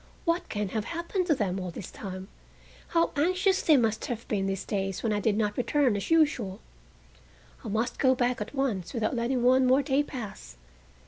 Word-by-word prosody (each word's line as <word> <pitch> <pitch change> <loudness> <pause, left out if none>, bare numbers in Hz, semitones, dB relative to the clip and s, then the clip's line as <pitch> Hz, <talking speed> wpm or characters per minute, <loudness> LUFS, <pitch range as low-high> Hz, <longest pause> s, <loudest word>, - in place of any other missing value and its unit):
What 335 +1 0
can 205 -2 -2
have 215 +1 -2
happened 345 +2 -2
to 310 - +4
them 195 -6 -1
all 185 -1 -4
this 175 +2 -8
time? 185 -1 -7 0.6
How 335 0 +2
anxious 370 +5 +2
they 310 -3 +5
must 225 -3 +1
have 235 -2 -5
been 195 -2 0
these 195 0 -3
days 195 -2 -2
when 225 -2 +1
I 205 - 0
did 205 0 +1
not 210 -2 0
return 255 -2 +2
as 200 - -3
usual. 285 - +2 1.0
I - - -7
must 220 +3 -1
go 260 -1 +4
back 245 -2 0
at 215 +7 -5
once 240 -8 -1
without 225 +1 0
letting 240 +1 0
one 255 +1 +5
more 265 +3 +4
day 275 0 +2
pass." 210 - -7
235 Hz, 195 wpm, -28 LUFS, 205-280 Hz, 1.0 s, they